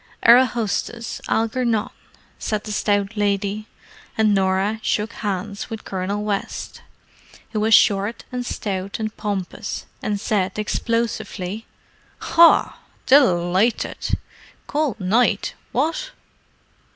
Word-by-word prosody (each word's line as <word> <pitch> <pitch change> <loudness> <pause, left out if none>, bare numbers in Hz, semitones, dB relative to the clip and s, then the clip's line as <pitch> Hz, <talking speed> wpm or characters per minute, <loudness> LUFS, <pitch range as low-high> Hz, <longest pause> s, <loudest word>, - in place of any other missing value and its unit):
"Our 240 +2 +8
hostess, 230 0 -3
Algernon," 225 -1 0 0.5
said 215 -1 -2
the 215 - -6
stout 205 0 0
lady, 205 +1 -1 0.5
and 215 -1 +4
Norah 195 +2 +1
shook 215 +1 -1
hands 205 0 -4
with 225 -2 -7
Colonel 195 +2 -2
West, 205 -2 -4 0.7
who 215 - -1
was 220 +1 +5
short 200 +3 +3
and 250 0 -3
stout 195 -4 -3
and 215 -1 -3
pompous, 200 -1 -4 0.2
and 205 -1 -1
said 195 -2 -1
explosively, 220 -2 -2 0.5
"Haw! 335 0 +5 0.3
Delighted! 200 -5 +3 0.5
Cold 295 -5 -1
night, 210 +2 +2 0.2
what?" 325 - -1
210 Hz, 105 wpm, -22 LUFS, 200-230 Hz, 0.7 s, Our